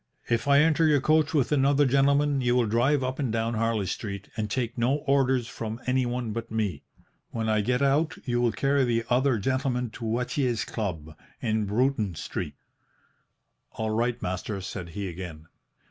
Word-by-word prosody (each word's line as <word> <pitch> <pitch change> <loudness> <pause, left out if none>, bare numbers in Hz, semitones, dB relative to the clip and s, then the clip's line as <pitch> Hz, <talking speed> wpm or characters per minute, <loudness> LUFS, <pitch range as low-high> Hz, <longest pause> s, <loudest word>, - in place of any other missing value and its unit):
"' - - -24
If 115 +3 -4
I 140 0 +6
enter 160 +1 +3
your 150 -2 +4
coach 155 +2 +2
with 140 -2 +2
another 145 0 +4
gentleman, 140 +1 +3
you 120 -1 +2
will 125 -2 +3
drive 125 +6 +2
up 130 +2 -3
and 135 -5 0
down 115 +1 -1
Harley 115 -2 0
Street, 100 +1 -5
and 110 -2 -2
take 120 0 -2
no 120 +3 +2
orders 130 -3 +2
from 110 0 -5
anyone 125 -2 0
but 115 +1 -5
me. 110 -4 -2 0.5
When 110 -1 -3
I 110 -1 +2
get 125 +5 +1
out, 150 +4 +2
you 120 -2 0
will 120 -1 +3
carry 140 +4 +1
the 115 -2 +1
other 130 0 +3
gentleman 125 +1 -1
to 115 - -9
Watier's 120 +1 -1
Club, 80 -8 -4 0.2
in 110 -2 0
Bruton 110 -3 0
Street.' - - -5 1.2
"'All 110 -1 -2
right, 120 +2 0
master,' 95 +3 -3
said 95 -2 -6
he 100 -1 -2
again. 85 -3 -7
120 Hz, 175 wpm, -27 LUFS, 110-135 Hz, 1.2 s, I